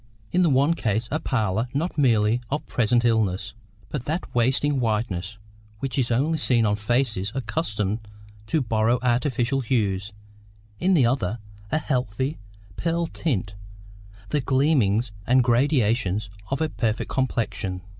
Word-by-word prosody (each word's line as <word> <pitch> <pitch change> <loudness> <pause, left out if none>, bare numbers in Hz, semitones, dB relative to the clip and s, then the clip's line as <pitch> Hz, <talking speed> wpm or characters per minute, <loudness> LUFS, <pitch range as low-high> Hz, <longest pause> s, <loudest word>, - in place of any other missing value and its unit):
In 180 - +3
the 175 - +4
one 140 +4 +4
case 110 -6 -1
a 155 - 0
pallor 110 -4 0
not 165 +6 -1
merely 115 -4 +3
of 150 +2 -2
present 120 +1 +2
illness, 110 -6 +1 0.4
but 140 -5 -4
that 165 +5 -3
wasting 130 +4 +2
whiteness 105 -4 -1 0.4
which 135 +4 -3
is 125 - +1
only 145 +7 +1
seen 120 -5 +3
on 105 -1 +2
faces 110 -2 0
accustomed 110 - -2 0.5
to 155 +4 +1
borrow 115 +1 +2
artificial 125 +1 +1
hues; 105 -5 0 0.7
in 190 +1 +3
the 135 -7 +5
other, 115 -4 0 0.3
a - - +2
healthy 130 0 -2 0.4
pearl 170 0 0
tint, 120 - -2 0.8
the 150 - +1
gleamings 125 -5 +2 0.2
and 130 +1 +5
gradations 115 - +1 0.2
of 135 - -1
a 160 - +1
perfect 115 -6 -2
complexion. 110 -7 -1
120 Hz, 135 wpm, -24 LUFS, 110-140 Hz, 0.8 s, the